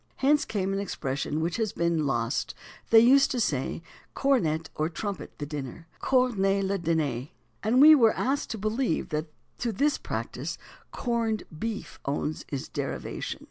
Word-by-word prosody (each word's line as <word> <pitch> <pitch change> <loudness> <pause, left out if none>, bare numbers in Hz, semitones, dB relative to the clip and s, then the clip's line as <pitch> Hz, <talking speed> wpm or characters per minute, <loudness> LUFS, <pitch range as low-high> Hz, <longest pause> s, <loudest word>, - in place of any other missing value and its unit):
Hence 290 +2 +3
came 195 -2 -1
an 195 - -1
expression 150 -5 -2
which 170 +4 -1
has 220 -4 -1
been 170 -3 +1
lost; 120 -1 -1 0.3
they 225 - +8
used 270 +4 +6
to 250 - -1
say 145 - -1 0.3
cornet 165 - +1
(or 155 +1 -1
trumpet) 185 -2 -5
the 145 - -4
dinner 145 +2 -6 0.2
(cornez 200 -7 +2
le 195 0 0
diner)." 150 -7 0 0.3
And 230 +4 +2
we 305 +3 +10
are 235 -7 +6
asked 275 +2 -1
to 225 - -3
believe 215 -1 -1
that 155 +1 -2 0.3
to 235 - -1
this 285 +8 +1
practice - - -4 0.3
"corned" 230 -3 -1
beef 220 +6 -5
owes 150 +2 -2
its 140 -2 -4
derivation. - - -4
195 Hz, 155 wpm, -27 LUFS, 155-235 Hz, 0.3 s, we